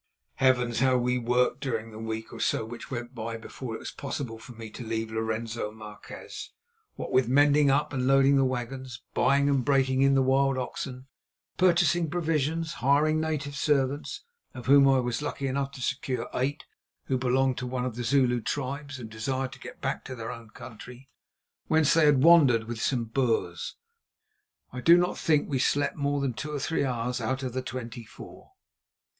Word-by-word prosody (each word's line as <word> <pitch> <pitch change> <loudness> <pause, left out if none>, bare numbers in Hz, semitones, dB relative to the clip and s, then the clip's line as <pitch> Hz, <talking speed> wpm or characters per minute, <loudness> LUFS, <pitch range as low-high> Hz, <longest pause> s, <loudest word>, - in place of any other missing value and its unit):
Heavens! 125 -3 +2
how 130 0 +4
we 125 0 +1
worked 125 +2 +1
during 115 -4 -3
the 110 - -9
week 110 0 -5
or - - -8
so - - 0
which 120 +1 -9
went 120 -1 -5
by 115 -1 -5
before 115 +1 -7
it - - -4
was - - -7
possible 130 -5 -5
for 125 +2 -11
me 110 -1 -9
to 120 - -8
leave 110 0 -3
Lorenzo 110 0 -3
Marquez. 105 -1 -9 0.5
What - - -6
with 130 -2 +3
mending 145 +2 +5
up 140 +2 +1
and 130 -1 -1
loading 135 +1 +5
the 135 - +4
wagons, 130 0 -4
buying 140 +1 +3
and 140 -3 +2
breaking 135 -1 +2
in 135 0 +4
the 135 - +4
wild 135 +1 +2
oxen, 130 0 -5 0.5
purchasing 175 -2 +3
provisions, 160 -1 -1
hiring 150 +4 +3
native 145 -3 -3
servants—of 145 - -2
whom 140 +1 +6
I 135 - +5
was 125 -1 -1
lucky 140 -2 -3
enough 135 +1 -1
to 130 - -7
secure 130 -2 -2
eight 140 +4 -2 0.4
who 130 -2 -1
belonged 130 0 +1
to 125 - -4
one 125 0 -2
of 125 -3 -4
the 120 - -4
Zulu 125 -1 +2
tribes 140 +3 -4
and 120 -3 -7
desired 130 +4 -3
to - - -12
get - - -10
back - - -2
to 130 - -6
their 115 -2 -5
own 115 -2 -10
country, 125 +3 -11 0.6
whence 155 -2 +4
they 165 -2 +5
had 140 -3 +4
wandered 145 -9 +6
with 115 -1 -6
some 125 -4 +1
Boers, 115 0 -1 1.0
I 125 - -5
do 170 +6 +7
not 175 0 0
think 155 -2 +3
that - - -10
we 135 - +1
slept 145 +2 +1
more 145 -1 -1
than 135 -3 -1
two 145 +8 -5
or 145 - -3
three 155 +2 0
hours 125 -1 -2
out 130 +4 -2
of 125 -2 -3
the 130 - -2
twenty 120 -2 -6
four. 110 - -13
130 Hz, 190 wpm, -27 LUFS, 120-140 Hz, 1.0 s, do